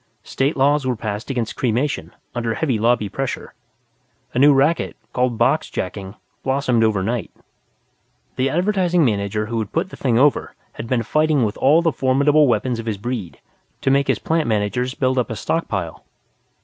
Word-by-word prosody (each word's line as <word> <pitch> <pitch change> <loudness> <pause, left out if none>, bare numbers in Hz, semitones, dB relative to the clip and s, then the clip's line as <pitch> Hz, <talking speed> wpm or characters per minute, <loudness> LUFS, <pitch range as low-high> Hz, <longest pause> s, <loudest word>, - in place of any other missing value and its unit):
State 140 +3 -1
laws 145 +2 +3
were 130 -1 0
passed 105 +1 -5
against 120 -5 -2
cremation, 130 +4 -1 0.2
under 115 -2 -2
heavy 130 -9 0
lobby 115 -1 +2
pressure. 135 +5 -4 0.8
A - - 0
new 145 +2 +7
racket, 145 +4 +2 0.2
called 125 -2 0
boxjacking, 95 0 -1 0.3
blossomed 130 -4 +1
overnight. 110 +2 0 1.1
The 130 +1 +1
Advertising 180 0 +2
Manager 105 -1 -1
who 115 +1 -3
had 110 - -4
put 180 +3 -1
the - - -8
thing 120 -4 +1
over 140 +3 +2 0.2
had 115 - -7
been 120 -1 0
fighting 150 +2 +2
with 105 - -3
all 155 +5 +4
the 165 - +2
formidable 140 +3 +3
weapons 120 +1 0
of 115 - -6
his 110 -2 -1
breed 110 -4 -5 0.4
to 135 - +2
make 140 0 +2
his - - +2
plant 160 -1 0
managers 115 +4 -1
build 130 -1 +1
up 125 - -1
a 115 - -4
stockpile. 100 - -3
125 Hz, 165 wpm, -20 LUFS, 110-140 Hz, 1.1 s, new